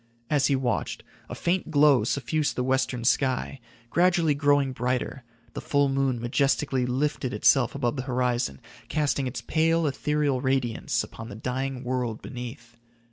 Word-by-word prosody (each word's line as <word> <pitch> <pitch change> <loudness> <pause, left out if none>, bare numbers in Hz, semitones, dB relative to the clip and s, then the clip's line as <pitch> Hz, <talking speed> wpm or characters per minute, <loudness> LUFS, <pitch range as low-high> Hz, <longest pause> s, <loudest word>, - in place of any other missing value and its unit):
As 145 -3 +3
he 140 - +2
watched, 130 -2 -2 0.3
a - - -5
faint 175 0 -1
glow 145 -6 +5
suffused 145 +6 -1
the 125 - -1
western 130 -2 0
sky, 130 +2 +1 0.3
gradually 175 -3 +3
growing 145 -1 +2
brighter, 125 +1 -2 0.3
the - - -5
full 140 -1 +2
moon 135 -2 0
majestically 130 +1 +1
lifted 130 0 -1
itself 130 -2 +3
above 130 -1 -1
the - - -1
horizon, 125 - 0 0.3
casting 145 -3 0
its 125 - -5
pale, 165 +1 +2
ethereal 145 -1 0
radiance 130 -4 0
upon 115 +1 -9
the - - -8
dying 130 +3 -3
world 125 -3 -2
beneath. 120 -1 -9
130 Hz, 145 wpm, -26 LUFS, 125-145 Hz, 0.3 s, glow